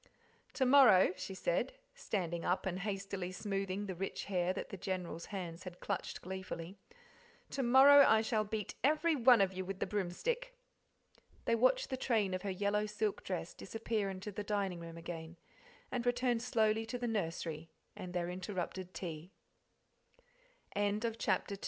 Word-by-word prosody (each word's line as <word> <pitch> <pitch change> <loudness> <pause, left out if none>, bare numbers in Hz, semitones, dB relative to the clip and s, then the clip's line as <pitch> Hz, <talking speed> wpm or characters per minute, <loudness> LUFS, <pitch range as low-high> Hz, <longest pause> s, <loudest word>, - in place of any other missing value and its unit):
"To 260 - +1
morrow," 245 -9 +7
she 190 - -6
said, - - 0 0.2
standing 175 - -3
up 180 - 0
and 185 -1 -2
hastily 195 -2 -3
smoothing 195 +1 -2
the 190 - -4
rich 190 +2 -4
hair 180 -2 0
that 190 - -5
the 195 - -6
General's 180 -3 -4
hands 180 -4 -6
had 180 -1 -9
clutched 200 -3 -4
gleefully 190 0 -6 0.7
"to 275 - -1
morrow 270 +3 +8
I 220 -4 +5
shall 220 -1 +1
beat 210 -1 -4
every 310 +3 +3
one 245 -4 +6
of 190 -1 +2
you 185 0 -3
with 195 +1 -5
the - - 0
broomstick." 460 - -2 0.9
They - - +2
watched 255 - +3
the 260 - -1
train 220 -7 +1
of 185 - -2
her 200 - -3
yellow' 205 +2 0
silk 210 -1 -2
dress 175 -3 -4
disappear 220 -1 -2
into 190 +2 -6
the 205 +1 -4
dining 200 -4 -1
room 165 0 -8
again, 165 0 -7 0.5
and 245 -2 -1
returned 245 -1 +1
slowly 225 -2 +2
to 245 - -3
the 245 0 -2
nursery 165 -6 -3 0.3
and 185 -3 -7
their 175 -1 -1
interrupted 185 0 -4
tea. 170 0 -6 1.4
CHAPTER 205 - +1
III 210 +3 +1
Virtue 225 - -7
Not 190 - +1
Alw 200 - -3
195 Hz, 170 wpm, -35 LUFS, 180-225 Hz, 1.4 s, morrow